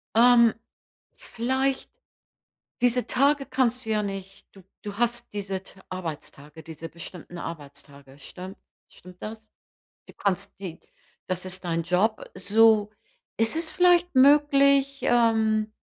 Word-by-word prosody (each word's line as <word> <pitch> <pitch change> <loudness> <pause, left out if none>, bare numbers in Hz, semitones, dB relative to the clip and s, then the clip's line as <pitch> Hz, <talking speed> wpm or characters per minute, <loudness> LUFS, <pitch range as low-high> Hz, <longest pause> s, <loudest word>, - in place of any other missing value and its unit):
Ähm. 235 0 +6 0.6
Vielleicht 265 +3 -2 0.9
diese 245 0 +2
Tage 280 +2 +2
kannst 255 -1 0
du - - -6
ja 215 -1 +1
nicht 195 -1 -7
du 195 - -16 0.2
du 205 -1 -7
hast 240 +1 -1
diese 195 -2 -4
t 195 - -18
Arbeitstage, 160 -4 -8
diese 165 0 -9
bestimmten 170 +1 -9
Arbeitstage, 140 -3 -10
stimmt 185 +6 -9 0.3
stimmt 180 0 -16
das? 220 0 -8 0.6
Du - - -14
kannst 200 0 -3
die 180 -4 -7 0.5
das 185 0 -3
ist 185 +1 -3
dein 165 -1 -1
Job, 185 +6 +1
so. 210 +2 +4 0.5
Ist 225 +4 +2
es 325 0 -1
vielleicht 355 0 +3
möglich, 275 0 +4
ähm, 220 -2 +2
215 Hz, 125 wpm, -25 LUFS, 185-245 Hz, 0.9 s, Ähm